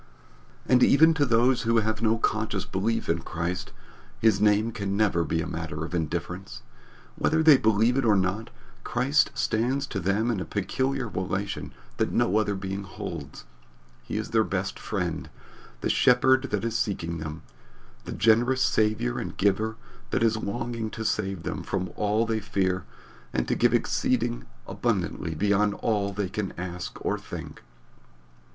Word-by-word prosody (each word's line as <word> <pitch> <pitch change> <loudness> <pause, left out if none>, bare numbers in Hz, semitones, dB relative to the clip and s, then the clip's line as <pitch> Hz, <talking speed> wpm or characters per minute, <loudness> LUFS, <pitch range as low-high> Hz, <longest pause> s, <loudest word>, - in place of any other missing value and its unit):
And 125 -1 +4
even 160 +5 +6
to 145 -3 +1
those 120 +2 +3
who 115 +1 +2
have 110 -1 0
no 115 0 +3
conscious 110 -3 -1
belief 110 +5 -1
in 85 +1 +1
Christ, 85 +2 -4 0.5
his 105 -3 +3
name 105 +2 +3
can 100 -2 -3
never 95 -6 +2
be 80 +1 -1
a - - -5
matter 80 -2 -4
of 85 - -9
indifference. 85 +3 -4 0.5
Whether 160 0 +2
they 155 -2 +9
believe 110 +1 +3
it 135 - +2
or 110 -3 +4
not, 95 +3 0 0.3
Christ 135 +4 +2
stands 130 +5 0
to 105 - -4
them 100 +6 +1
in 110 - -1
a - - -2
peculiar 130 +5 -1
relation 95 0 -3 0.3
that - - 0
no 100 - +2
other 105 -2 +1
being 95 +1 -4
holds. 95 -3 -7 0.6
He - - -5
is - - -4
their - - +4
best - - -3
Friend, - - -3 0.5
the - - -1
Shepherd 130 +2 +4
that 105 +1 -1
is 115 -1 -2
seeking 85 -6 -1
them, 80 0 -6 0.6
the - - -6
generous 120 +4 +3
Saviour 110 +2 +1
and - - -6
Giver 105 +3 +1 0.3
that - - +1
is 110 -1 +3
longing 115 +1 -3
to 110 +1 -6
save 95 -5 -1
them - - -3
from 95 -2 -3
all 105 +2 +1
that 115 - -1
they 110 - 0
fear 95 -3 -1 0.5
and - - 0
to - - +1
give - - +3
exceeding - - 0 0.2
abundantly 80 -1 -2
beyond 100 +3 +2
all 100 -3 0
they 100 0 -2
can 100 0 -3
ask 90 0 -5
or - - 0
think. - - -8
105 Hz, 165 wpm, -26 LUFS, 95-115 Hz, 0.6 s, they